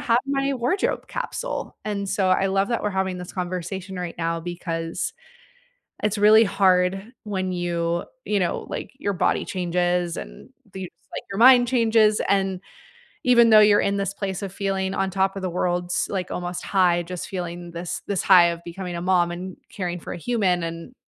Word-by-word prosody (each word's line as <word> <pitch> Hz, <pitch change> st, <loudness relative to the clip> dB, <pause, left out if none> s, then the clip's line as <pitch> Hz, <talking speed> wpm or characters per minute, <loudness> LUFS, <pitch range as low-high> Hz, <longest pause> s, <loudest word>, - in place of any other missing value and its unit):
have 230 Hz, +1 st, +3 dB
my 275 Hz, 0 st, 0 dB
wardrobe 255 Hz, +11 st, -1 dB
capsule," -, -, -4 dB
and 200 Hz, -2 st, -3 dB
so 195 Hz, -1 st, +1 dB
I 195 Hz, +1 st, +3 dB
love 195 Hz, +1 st, +1 dB
that 235 Hz, -, -1 dB
we're 210 Hz, -, 0 dB
having 190 Hz, -1 st, -1 dB
this 180 Hz, -, -8 dB
conversation 185 Hz, +1 st, -4 dB
right 175 Hz, -1 st, -5 dB
now, 165 Hz, 0 st, -1 dB
because 165 Hz, -1 st, -4 dB, 0.9 s
it's 210 Hz, 0 st, +1 dB
really 215 Hz, +2 st, +7 dB
hard 195 Hz, +2 st, +2 dB
when 190 Hz, -3 st, -2 dB
you, 170 Hz, -1 st, -1 dB, 0.2 s
you 210 Hz, -, +1 dB
know, 180 Hz, -2 st, -1 dB
like, -, -, -5 dB
your 200 Hz, -7 st, -1 dB
body 180 Hz, -, +1 dB
changes 175 Hz, -1 st, -1 dB
and -, -, -9 dB, 0.3 s
you, 190 Hz, -1 st, -5 dB
just, -, -, -28 dB
like, -, -, -5 dB
your 195 Hz, -, -4 dB
mind 245 Hz, 0 st, +7 dB
changes, 225 Hz, -3 st, +3 dB
and 195 Hz, -2 st, +1 dB, 0.6 s
even 235 Hz, -2 st, +6 dB
though 215 Hz, -1 st, +8 dB
you're 210 Hz, -1 st, +6 dB
in 200 Hz, 0 st, 0 dB
this 195 Hz, -1 st, -2 dB
place 195 Hz, -2 st, -4 dB
of 195 Hz, -1 st, -5 dB
feeling 195 Hz, -1 st, -1 dB
on 195 Hz, -, 0 dB
top 195 Hz, +1 st, +1 dB
of 195 Hz, -, -5 dB
the 185 Hz, -, -2 dB
world, 175 Hz, 0 st, -1 dB
s 175 Hz, -, -1 dB
like 185 Hz, -3 st, -3 dB
almost 175 Hz, 0 st, -4 dB
high, 180 Hz, -3 st, +2 dB
just 180 Hz, 0 st, -6 dB
feeling 175 Hz, -2 st, -5 dB
this 170 Hz, +1 st, -5 dB
this 200 Hz, -3 st, 0 dB
high 180 Hz, -3 st, +7 dB
of 170 Hz, 0 st, -5 dB
becoming 175 Hz, +1 st, -6 dB
a 170 Hz, -, -4 dB
mom 175 Hz, -1 st, +2 dB
and 180 Hz, +1 st, -7 dB
caring 180 Hz, -4 st, -4 dB
for -, -, -7 dB
a -, -, -6 dB
human, 190 Hz, -4 st, +1 dB
and 165 Hz, +8 st, -6 dB
190 Hz, 190 wpm, -24 LUFS, 175-205 Hz, 0.9 s, though